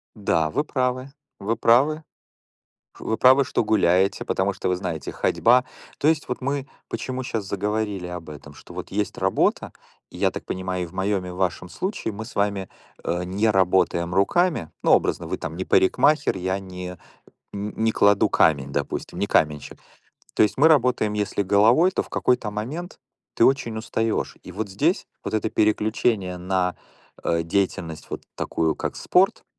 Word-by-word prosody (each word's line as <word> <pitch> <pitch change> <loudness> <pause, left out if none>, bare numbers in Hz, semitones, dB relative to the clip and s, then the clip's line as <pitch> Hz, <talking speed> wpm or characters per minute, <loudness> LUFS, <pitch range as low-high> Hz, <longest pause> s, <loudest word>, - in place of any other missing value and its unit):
Да, 80 -7 +1
вы 145 - 0
правы. 130 -2 -2 0.3
Вы 110 +4 -1
правы. 140 +8 +3 1.0
Вы 110 - -2
правы, 130 +4 +6
что - - 0
гуляете, 95 -3 +2
потому 95 +1 0
что - - -4
вы 90 - +2
знаете 85 -3 -4
ходьба 125 +2 +3 0.4
то 145 - +2
есть 155 -2 +2
вот 125 - -4
мы 140 +1 -2 0.2
почему 130 0 -4
щас 110 -4 -3
заговорили 100 -1 -2
об 90 -3 -7
этом? 75 -1 -11
Что - - -14
вот - - -7
есть 105 0 -2
работа, 95 0 +1 0.4
и - - -12
я - - +2
так - - -7
понимаю, 95 -1 -3
и - - -3
в 85 - -13
моем 95 0 -1
и - - -6
в 90 - -8
вашем 90 -1 -2
случае 185 - -3
мы 110 +2 -6
с 120 - -12
вами, 100 -1 0 0.4
э, 85 +1 -1
не 100 +5 0
работаем 90 -3 +2
руками. 145 - +2
Ну, - - +3
образно, - - +2
вы - - -3
там 80 0 -6
не 95 - -3
парикмахер, 145 +9 +3
я 95 +1 -1
не 90 -1 -8 0.6
не 105 +2 -1
кладу 100 -1 +4
камень, 70 -3 +2
допустим, - - -4
не - - 0
каменщик. 75 -2 0 0.6
То - - +2
есть 105 -2 +3
мы 145 +4 +6
работаем 125 -8 +3
если 105 -1 -1
головой, 110 - +4
то - - 0
в - - -10
какой-то 125 -4 +1
момент 130 +13 -6 0.4
ты 115 - +5
очень 125 -5 +1
устаешь. 110 0 -2
И - - -10
вот 100 +3 -4
здесь 95 - 0 0.2
вот - - -2
это 110 0 -1
переключение 105 -3 +1
на, 90 0 -1 0.5
э, 85 0 +1
деятельность 85 -2 -2
вот - - -6
такую, 80 -1 0
как - - -4
спорт, 195 +5 +2
100 Hz, 170 wpm, -24 LUFS, 90-120 Hz, 1.0 s, правы